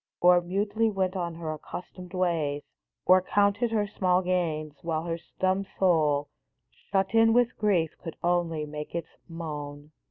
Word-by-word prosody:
Or 180 0 +6
mutely 205 +5 0
went 190 -2 -1
on 170 -3 -2
her 160 -2 -4
accustomed 180 +3 -9
ways, 160 -6 0 0.4
Or 185 0 +6
counted 205 +5 +2
her 215 -2 +1
small 185 -3 +1
gains, 165 -4 -1
while 160 -1 -2
her 170 0 -3 0.2
dumb 190 +1 +2
soul, 150 -6 +3 0.4
Shut 195 0 -2
in 225 0 +5
with 245 0 +3
grief, 180 -7 +2
could 165 - -6
only 170 -3 +1
make 150 +2 -7
its 165 -1 -5
moan 150 -3 -6
175 Hz, 150 wpm, -28 LUFS, 160-195 Hz, 0.4 s, Or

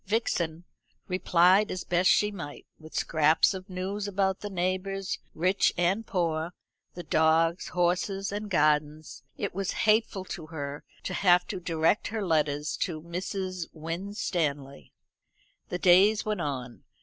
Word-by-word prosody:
Vixen 175 -6 -1 0.4
replied 185 +2 +4
as 185 - -4
best 180 +1 +2
she 210 0 +3
might, 165 -8 -8
with 155 0 -13
scraps 155 +3 +3
of 185 +1 -8
news 195 +3 -3
about 195 -1 0
the 205 - -6
neighbours, 185 +1 -2 0.2
rich 185 +4 +2
and 190 +6 +1
poor, 165 -2 -1 0.4
the 175 - -6
dogs, 165 +2 +2
horses, 180 +3 0
and 205 +1 -4
gardens. 150 -2 +1 0.2
It - - -3
was 195 +1 -2
hateful 215 -3 +2
to 160 -3 -7
her 145 -2 -6 0.2
to 185 - -4
have 180 -1 +4
to 190 - -3
direct 165 +2 +1
her 220 -2 -3
letters 150 -3 0
to 165 -4 -2
Mrs. 185 +1 -4
Winstanley. 160 -5 -3 0.8
The 180 - -2
days 190 +5 +5
went 210 -4 -1
on. 130 -5 -5
180 Hz, 135 wpm, -28 LUFS, 160-195 Hz, 0.8 s, days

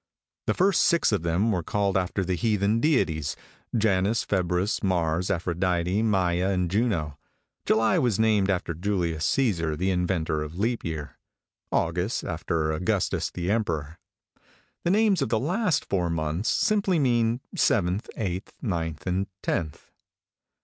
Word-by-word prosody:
"The - - +1
first 195 +1 +3
six 170 -7 +3
of 105 - +1
them 85 +7 +1
were 90 -4 0
called 100 +3 -1
after 95 +1 0
the 90 - -1
heathen 105 +3 +1
deities, 80 - +1 0.4
Janus, 105 +1 +1
Februus, 95 +1 0
Mars, 90 -2 0
Aphrodite, 90 +2 0
Maia, 95 -4 +1
and 90 -3 0
Juno; 90 - 0 0.5
July 110 +11 +3
was 120 -9 +1
named 110 -3 +3
after 90 -3 -1
Julius 85 -3 -1
Cæsar, 85 - +1
the 95 +3 0
inventor 90 -4 0
of 75 +3 -6
leap 115 +4 -1
year; 80 -3 -5 0.5
August 90 +6 0
after 80 -2 -1
Augustus 80 +3 0
the 90 +2 -3
Emperor. 85 -8 -2 0.8
The - - +1
names 205 -2 +3
of 135 - 0
the 110 - +1
last 180 - 0
four 90 -3 0
months 80 +5 -1
simply 205 -5 +2
mean 120 -4 +2 0.2
seventh, 90 +5 +1
eighth, 95 -3 -3
ninth, 80 - -3
and 95 +1 -1 0.2
tenth." 80 -5 -3
95 Hz, 140 wpm, -26 LUFS, 85-110 Hz, 0.8 s, first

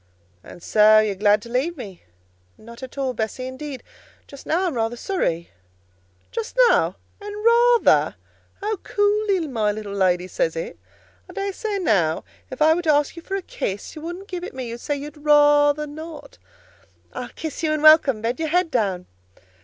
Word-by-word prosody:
"And 175 - -13
so 215 0 +5
you're 215 -1 +3
glad 205 +1 +2
to 235 - -11
leave 275 +8 -1
me?" 195 -8 -9 0.6
"Not 235 +2 -13
at 260 +1 -9
all, 265 -2 -1
Bessie; 225 +3 -4
indeed, 265 +1 -7 0.4
just 280 - -13
now 350 +4 +1
I'm 350 - -1
rather 230 -1 -1
sorry." 170 - -2 0.8
"Just 460 +2 -5
now! - - +2 0.3
and 415 +1 -7
rather! 475 0 +4 0.5
How 425 +1 -2
coolly 410 -1 +1
my 225 -7 0
little 205 -1 -6
lady 185 -2 +1
says - - -1
it! - - -6 0.5
I - - -11
dare 395 -1 -3
say 420 0 -3
now 190 - +1 0.3
if 260 +3 -1
I 315 +1 +6
were 345 - -1
to 320 -3 +2
ask 290 +1 +1
you 335 - -9
for 385 - -5
a 390 - -3
kiss 200 - -5
you 310 - -8
wouldn't 350 +4 -7
give 360 -2 -6
it 360 - -7
me: 255 -2 -5
you'd 235 +1 -6
say 290 -1 -2
you'd 295 +2 -8
rather 295 0 +4
not." 310 +2 -10 0.7
"I'll - - -6
kiss 315 -2 -6
you 315 -2 0
and 310 -1 -1
welcome: 310 -8 +6
bend 235 +4 -1
your 320 -1 -1
head 355 0 +1
down." 195 -8 -1
295 Hz, 185 wpm, -22 LUFS, 225-360 Hz, 0.8 s, I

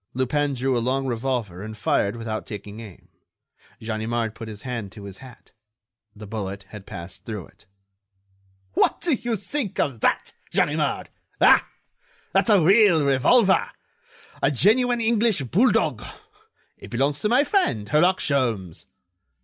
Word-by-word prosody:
Lupin 140 +2 0
drew 130 +1 0
a 120 - +1
long 130 +3 0
revolver 120 -7 -2
and 110 +1 -8
fired 100 0 0
without 115 -2 -5
taking 105 0 -8
aim. 105 -6 -12 0.7
Ganimard 110 0 -2
put 115 0 -9
his 105 +1 -9
hand 115 -7 -5
to 105 -2 -11
his 100 -1 -9
hat: 130 -3 -15 0.6
the 105 0 -10
bullet 100 -2 -5
had 105 -2 -11
passed 95 0 -9
through 105 -6 -6
it. - - -23 1.1
"What - - +2
do 340 - +1
you 240 -2 -1
think 210 +2 -4
of 130 -6 0
that, - - 0 0.2
Ganimard! - - 0 0.3
Ah! - - +5 0.6
that's 195 +4 +2
a 205 -3 +6
real 190 -4 +5
revolver! 185 - +4 0.7
A - - +3
genuine 235 - +3
English 225 -3 +2
bulldog. 200 - +2 0.8
It - - -11
belongs 140 +4 0
to 210 - 0
my 250 +5 +4
friend, 275 - 0
Herlock 175 - +3
Sholmes." 115 - -1
125 Hz, 140 wpm, -24 LUFS, -, 1.1 s, a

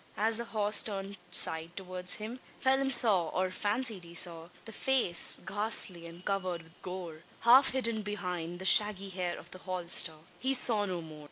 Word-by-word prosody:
As 220 +2 0
the 235 - -5
horse 210 -2 +4
turned 200 -1 -5
side 160 +2 +2
towards 185 -1 +1
him, 225 +4 -7 0.2
Phelim 270 0 +1
saw, 210 -10 +4
or 185 +2 -2
fancied 210 0 -2
he 170 0 -13
saw, 165 -1 +1 0.2
the 225 - -10
face 245 -8 0
ghastly 200 -4 -1
and 170 +2 -14
covered 185 -4 -3
with 165 +1 -22
gore 180 -4 -8 0.2
half 255 +4 +6
hidden 230 -4 -3
behind 180 -5 -5
the 190 - -9
shaggy 200 -1 +5
hair 180 -2 -4
of 175 - -12
the 185 - -10
holster! 180 -3 +2 0.2
He 265 +1 0
saw 220 -5 0
no 180 -2 -4
more. 155 -1 -12
190 Hz, 175 wpm, -30 LUFS, 175-220 Hz, 0.2 s, half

